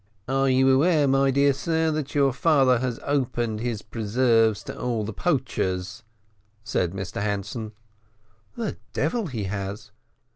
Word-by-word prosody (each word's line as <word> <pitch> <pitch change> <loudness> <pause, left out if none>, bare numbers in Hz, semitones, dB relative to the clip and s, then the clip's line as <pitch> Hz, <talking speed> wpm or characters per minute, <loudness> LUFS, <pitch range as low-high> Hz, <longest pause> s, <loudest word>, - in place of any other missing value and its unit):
"Are 135 +1 +2
you 130 0 +4
aware, 150 +2 +4
my 135 0 +3
dear 140 +1 +3
sir, 160 +3 0
that 150 -2 -4
your 140 -2 +3
father 135 -4 +3
has 125 -2 -2
opened 120 -6 -1
his 115 -3 -3
preserves 115 -1 +1
to - - -7
all 120 -3 -2
the 110 +1 -5
poachers?" 100 - -1 0.6
said 90 -4 -1
Mr 95 +1 -5
Hanson. 105 +2 -3 0.8
"The 225 -3 -3 0.2
devil 235 -5 -1
he 115 -8 -4
has!" 100 +2 -5
125 Hz, 140 wpm, -25 LUFS, 105-140 Hz, 0.8 s, you